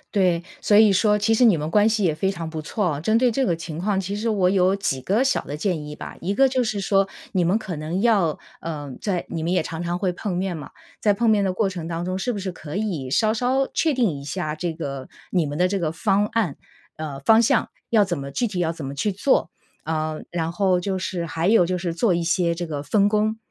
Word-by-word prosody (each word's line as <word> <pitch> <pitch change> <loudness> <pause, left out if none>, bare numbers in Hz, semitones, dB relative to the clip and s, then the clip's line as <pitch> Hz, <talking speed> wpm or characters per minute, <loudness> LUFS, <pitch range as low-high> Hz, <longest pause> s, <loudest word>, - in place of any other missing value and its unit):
对。 180 -4 +2 0.2
所 205 - +3
以 215 -1 +7
说 210 +2 +3
其 220 +2 +2
实 245 - +4
你 215 -7 +6
们 155 +1 -3
关 210 +3 +4
系 220 -2 +1
也 165 -4 +2
非 190 +5 0
常 170 -4 -5
不 160 -1 -5
错， 170 -4 -1
针 220 +8 +2
对 250 0 +3
这 270 +4 +1
个 175 -9 +1
情 165 -1 -7
况， 195 +2 0
其 195 +1 -4
实 220 +3 -2
我 195 -5 +2
有 190 0 +3
几 140 -9 -1
个 200 - +1
小 - - +1
的 145 - -6
建 155 -2 -2
议 150 - -8
吧。 - - -8
一 195 +3 -2
个 270 +4 +5
就 255 -1 +1
是 215 -3 -2
说 195 0 +2 0.2
你 185 -3 +2
们 185 +6 +2
可 185 -6 -6
能 155 +5 -3
要 200 -9 +2 0.2
呃， 145 -4 -5
在 185 -4 -2
你 165 - -4
们 170 +2 0
也 180 - +2
常 165 +1 -5
常 175 +1 -2
会 185 -2 0
碰 180 0 -4
面 185 -1 -2
嘛， 150 - -8 0.3
在 210 - +4
碰 230 +3 +1
面 205 -2 +3
的 190 - +1
过 195 +2 +1
程 175 -4 -6
当 170 0 -3
中， 185 +1 -2
是 245 +6 -1
不 210 - -4
是 190 -1 -4
可 155 -2 -8
以 175 -12 -2
稍 215 - +2
稍 255 +3 +1
确 320 - +2
定 245 -8 +2
一 140 - -10
下 155 0 -3
这 170 +2 -3
个 140 -5 -6 0.2
你 175 -5 +1
们 145 +1 -4
的 180 - +4
这 195 +2 -1
个 165 -4 -1
方 195 +5 +1
案 210 -9 -1 0.4
呃， 150 -3 -5
方 220 +10 +5
向 230 - +2 0.2
要 215 -3 +5
怎 175 -5 -3
么 140 0 -6
具 240 - 0
体 190 -5 -3
要 165 -1 +1
怎 160 -3 -8
么 140 - -5
去 180 +9 0
做。 205 - +1 0.3
呃， 155 0 -2
然 165 -1 -2
后 185 0 +2
就 190 +2 -2
是 180 -2 -3
还 165 +2 -1
有 215 -5 +5
就 185 +1 -1
是 175 -1 -2
做 180 +3 +2
一 170 - 0
些 170 0 +1
这 170 0 -5
个 145 -2 -4
分 205 +4 +3
工。 215 +1 +1
185 Hz, 280 characters per minute, -23 LUFS, 165-210 Hz, 0.4 s, 以